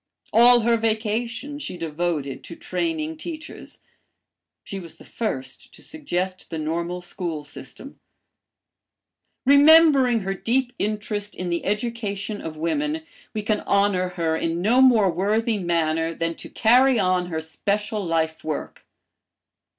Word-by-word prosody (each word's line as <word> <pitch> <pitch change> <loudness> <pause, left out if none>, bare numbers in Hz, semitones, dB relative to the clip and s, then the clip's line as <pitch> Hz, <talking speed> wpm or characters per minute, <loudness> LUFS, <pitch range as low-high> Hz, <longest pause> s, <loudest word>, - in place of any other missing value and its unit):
"All 240 +1 +7
her 230 +1 +3
vacation 230 +5 -2
she 180 - -5
devoted 160 -4 -3
to 170 - -9
training 160 -3 -3
teachers. 320 - -9 0.8
She 195 - -6
was 170 -3 -11
the - - -16
first 175 - -5
to - - -13
suggest 185 - -4
the 165 - -4
normal 170 +3 -3
school 175 -3 -5
system. 145 - -11 1.5
Remembering 280 -4 +6
her 195 0 -2
deep 245 +5 0
interest 210 0 -3
in 180 -1 -4
the 170 - -1
education 210 -1 -3
of 155 -1 -7
women, 295 - -1 0.3
we 215 - -2
can 210 0 +1
honor 200 -2 +1
her 165 -1 +1
in 165 +1 -1
no 230 +8 +3
more 225 -8 +5
worthy 210 +5 0
manner 165 -2 0
than 165 0 -1
to - - -8
carry 250 +3 +4
on 185 -3 +1
her 160 -2 -3
special 205 +6 -2
lifework. 160 -2 -2
200 Hz, 130 wpm, -23 LUFS, 165-235 Hz, 1.5 s, All